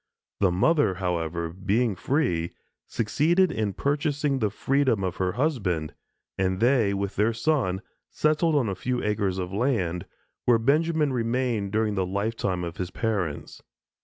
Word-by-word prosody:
The 95 Hz, -, +4 dB
mother, 100 Hz, -, +2 dB
however, 85 Hz, -2 st, -2 dB
being 100 Hz, +4 st, 0 dB
free, 90 Hz, -, 0 dB, 0.3 s
succeeded 165 Hz, -, +2 dB
in 110 Hz, -7 st, -1 dB
purchasing 145 Hz, -, 0 dB
the 110 Hz, -3 st, +1 dB
freedom 130 Hz, -1 st, +1 dB
of 90 Hz, -1 st, -2 dB
her 90 Hz, -1 st, 0 dB
husband, 100 Hz, -, -1 dB, 0.5 s
and 95 Hz, -1 st, +1 dB
they, 120 Hz, -3 st, +3 dB
with 100 Hz, 0 st, -3 dB
their 110 Hz, +3 st, +3 dB
son, 115 Hz, -7 st, 0 dB, 0.3 s
settled 155 Hz, +1 st, +2 dB
on 135 Hz, -6 st, +2 dB
a 100 Hz, -, -1 dB
few 125 Hz, +5 st, -2 dB
acres 105 Hz, -3 st, 0 dB
of 90 Hz, 0 st, -4 dB
land, 100 Hz, -7 st, 0 dB, 0.4 s
where 120 Hz, -2 st, +5 dB
Benjamin 150 Hz, +4 st, +2 dB
remained 115 Hz, -4 st, -1 dB
during 110 Hz, 0 st, +1 dB
the 95 Hz, -2 st, -1 dB
lifetime 100 Hz, -2 st, -1 dB
of 85 Hz, -1 st, -5 dB
his 90 Hz, -1 st, -3 dB
parents. 95 Hz, -10 st, -3 dB
110 Hz, 145 wpm, -26 LUFS, 95-135 Hz, 0.5 s, where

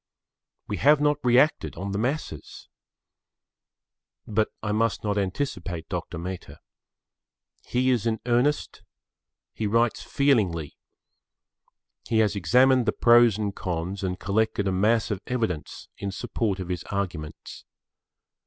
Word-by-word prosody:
We -, -, -3 dB
have 150 Hz, +1 st, +5 dB
not 145 Hz, 0 st, +1 dB
reacted 125 Hz, +5 st, +3 dB
on 100 Hz, +1 st, -5 dB
the 100 Hz, -, -2 dB
masses. 125 Hz, -, -4 dB, 1.6 s
But 110 Hz, 0 st, 0 dB
I 105 Hz, -, -1 dB
must 115 Hz, +1 st, 0 dB
not 105 Hz, -1 st, 0 dB
anticipate 95 Hz, -, -3 dB
Dr. -, -, -4 dB
Mehta. 90 Hz, +2 st, -7 dB, 1.1 s
He 130 Hz, +1 st, +2 dB
is 120 Hz, -2 st, +1 dB
in 110 Hz, -1 st, 0 dB
earnest. 125 Hz, +5 st, +1 dB, 0.7 s
He 110 Hz, -, -2 dB
writes 115 Hz, +2 st, +1 dB
feelingly. 100 Hz, -, +1 dB, 1.3 s
He 115 Hz, -, +1 dB
has 105 Hz, -2 st, +3 dB
examined 125 Hz, +7 st, +4 dB
the -, -, +4 dB
pros 120 Hz, -3 st, +5 dB
and 105 Hz, -2 st, -3 dB
cons 90 Hz, +2 st, -3 dB
and 90 Hz, 0 st, -2 dB
collected 100 Hz, 0 st, 0 dB
a -, -, +1 dB
mass 110 Hz, +5 st, +2 dB
of 100 Hz, -2 st, -3 dB
evidence 110 Hz, -11 st, -3 dB
in 100 Hz, -, -3 dB
support 100 Hz, -1 st, -2 dB
of 95 Hz, -1 st, -5 dB
his 90 Hz, -3 st, -3 dB
arguments. 90 Hz, -6 st, -5 dB
105 Hz, 125 wpm, -26 LUFS, 95-120 Hz, 1.6 s, have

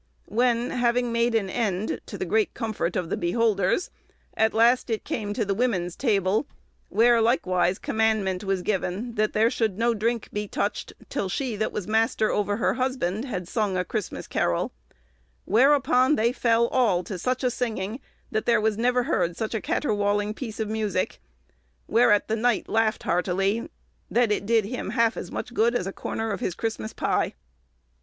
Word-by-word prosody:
When, 240 Hz, +1 st, +1 dB
having 245 Hz, 0 st, +1 dB
made 235 Hz, 0 st, +1 dB
an 210 Hz, -4 st, +1 dB
end, 205 Hz, -1 st, -2 dB
to -, -, -7 dB
the -, -, -3 dB
great 435 Hz, -1 st, +1 dB
comfort 220 Hz, -7 st, -2 dB
of 180 Hz, -1 st, -2 dB
the -, -, +2 dB
beholders, 205 Hz, -, +1 dB, 0.4 s
at 220 Hz, 0 st, +3 dB
last 240 Hz, +3 st, +4 dB
it 220 Hz, -2 st, -1 dB
came 205 Hz, -3 st, -3 dB
to 225 Hz, -, 0 dB
the 200 Hz, -, 0 dB
woman's 190 Hz, -6 st, 0 dB
table, 210 Hz, 0 st, +1 dB, 0.4 s
where, 235 Hz, +1 st, +4 dB
likewise, 185 Hz, -6 st, +2 dB
commandment 215 Hz, -5 st, 0 dB
was 195 Hz, -2 st, -1 dB
given, 205 Hz, +4 st, -2 dB
that 215 Hz, -1 st, 0 dB
there 225 Hz, +2 st, +3 dB
should 215 Hz, -5 st, -1 dB
no 235 Hz, +1 st, +2 dB
drinke 230 Hz, +1 st, -1 dB
be 210 Hz, 0 st, -2 dB
touched -, -, -2 dB, 0.2 s
till 195 Hz, -, -2 dB
she 245 Hz, +3 st, -2 dB
that 215 Hz, +1 st, -1 dB
was 205 Hz, -, -4 dB
master 220 Hz, 0 st, +2 dB
ouer 205 Hz, 0 st, 0 dB
her 230 Hz, -, +1 dB
husband 250 Hz, -5 st, -1 dB
had 185 Hz, -9 st, -4 dB
sung 205 Hz, -3 st, -1 dB
a 180 Hz, -, 0 dB
Christmas 215 Hz, -1 st, -4 dB
carroll; 85 Hz, -1 st, 0 dB, 0.7 s
whereupon 260 Hz, +3 st, +4 dB
they 230 Hz, 0 st, +2 dB
fell 235 Hz, -2 st, +2 dB
all 215 Hz, -9 st, +2 dB
to 190 Hz, -2 st, -6 dB
such 255 Hz, +7 st, -1 dB
a 250 Hz, -, +2 dB
singing, 225 Hz, -2 st, -3 dB, 0.3 s
that 215 Hz, -, -2 dB
there 235 Hz, -2 st, +4 dB
was 215 Hz, 0 st, 0 dB
never 250 Hz, +1 st, +2 dB
heard 175 Hz, -, 0 dB
such 220 Hz, 0 st, -3 dB
a 220 Hz, -, -1 dB
catterwalling 205 Hz, -9 st, 0 dB
peece 220 Hz, -2 st, -7 dB
of 220 Hz, -, -1 dB
musicke; 210 Hz, -, -2 dB, 0.7 s
whereat 225 Hz, -3 st, +4 dB
the 220 Hz, -, 0 dB
knight 235 Hz, 0 st, +1 dB
laughed 225 Hz, 0 st, +1 dB
heartely, 195 Hz, +5 st, 0 dB, 0.4 s
that 240 Hz, -2 st, +2 dB
it 205 Hz, -1 st, -1 dB
did 225 Hz, -2 st, +3 dB
him 230 Hz, -1 st, -4 dB
halfe 230 Hz, -2 st, +2 dB
as -, -, -6 dB
muche 245 Hz, -, -5 dB
good 235 Hz, +1 st, +2 dB
as 185 Hz, -, 0 dB
a 195 Hz, -, -4 dB
corner 225 Hz, 0 st, -3 dB
of 200 Hz, -, -3 dB
his 175 Hz, -, -2 dB
Christmas 220 Hz, +1 st, -3 dB
pie." -, -, -1 dB
220 Hz, 180 wpm, -25 LUFS, 200-235 Hz, 0.7 s, last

